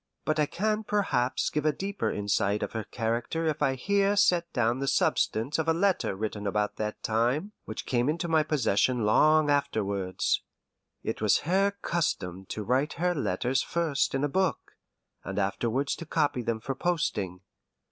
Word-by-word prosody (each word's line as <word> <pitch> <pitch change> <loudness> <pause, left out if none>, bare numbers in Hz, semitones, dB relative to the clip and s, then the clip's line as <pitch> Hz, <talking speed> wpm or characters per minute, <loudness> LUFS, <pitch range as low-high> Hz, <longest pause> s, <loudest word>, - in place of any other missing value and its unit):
But 155 0 0
I 150 - +3
can 215 +5 -1
perhaps 190 -13 0
give 150 - -1
a 155 - +3
deeper 195 +6 -3
insight 100 0 0
of - - -3
her 110 -2 -4
character 120 +8 -2
if 155 -2 -1
I 135 - +2
here 200 +8 +2
set 175 -4 +3
down 120 0 +1
the 135 - -2
substance 130 +2 +1
of 160 - -1
a 165 - +3
letter 190 - +1
written 105 0 -3
about 105 +1 -1
that 105 0 -4
time, 120 - 0
which 110 - -6
came 125 +2 +1
into 170 +3 -1
my 160 -1 +3
possession 130 -5 +1
long 155 +7 +4
afterwards. 100 -10 0 0.6
It - - -3
was 105 -2 +3
her 195 +4 +3
custom 95 - -2
to 105 - -4
write 130 +7 +1
her 180 +1 0
letters 125 - 0
first 160 -5 0
in 135 - 0
a - - +3
book, 185 +4 -1 0.5
and 95 +1 -5
afterwards 115 +7 0
to 170 - -8
copy 145 -5 +1
them 115 -1 -2
for 135 - -3
posting. 105 - -1
135 Hz, 170 wpm, -28 LUFS, 110-165 Hz, 0.6 s, long